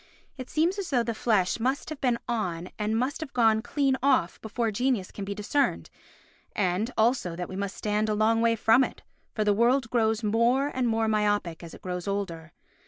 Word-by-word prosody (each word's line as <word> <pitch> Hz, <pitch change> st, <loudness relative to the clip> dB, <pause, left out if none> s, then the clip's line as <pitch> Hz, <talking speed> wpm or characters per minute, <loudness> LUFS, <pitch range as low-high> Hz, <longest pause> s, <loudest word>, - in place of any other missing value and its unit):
It 255 Hz, -2 st, -8 dB
seems 340 Hz, +6 st, +1 dB
as 385 Hz, -, -4 dB
though 250 Hz, -5 st, +2 dB
the 230 Hz, 0 st, -2 dB
flesh 215 Hz, -3 st, +1 dB
must 260 Hz, +6 st, -1 dB
have 310 Hz, -3 st, -7 dB
been 245 Hz, -3 st, +2 dB
on 185 Hz, -7 st, -2 dB
and 215 Hz, +1 st, 0 dB
must 260 Hz, +6 st, -1 dB
have 300 Hz, -3 st, -6 dB
gone 225 Hz, -2 st, +3 dB
clean 270 Hz, +2 st, +1 dB
off 260 Hz, -10 st, +2 dB
before 225 Hz, +1 st, -2 dB
genius 240 Hz, -3 st, 0 dB
can 200 Hz, -, -6 dB
be 200 Hz, +1 st, -4 dB
discerned, 240 Hz, +8 st, -1 dB, 0.6 s
and 190 Hz, +3 st, 0 dB
also 220 Hz, -6 st, +1 dB
that 175 Hz, 0 st, -4 dB
we 185 Hz, -, -8 dB
must 200 Hz, 0 st, -4 dB
stand 210 Hz, 0 st, 0 dB
a 210 Hz, -, +1 dB
long 225 Hz, +2 st, +2 dB
way 230 Hz, 0 st, +3 dB
from 225 Hz, +3 st, +4 dB
it, -, -, -6 dB, 0.3 s
for 215 Hz, -, +1 dB
the 210 Hz, -1 st, +3 dB
world 235 Hz, +3 st, +2 dB
grows 225 Hz, -1 st, +1 dB
more 235 Hz, +6 st, +2 dB
and 255 Hz, -3 st, -1 dB
more 225 Hz, -1 st, +1 dB
myopic 205 Hz, -5 st, 0 dB
as 170 Hz, -2 st, -10 dB
it -, -, -16 dB
grows 180 Hz, 0 st, -4 dB
older. 170 Hz, -5 st, -4 dB
225 Hz, 205 wpm, -27 LUFS, 200-250 Hz, 0.6 s, from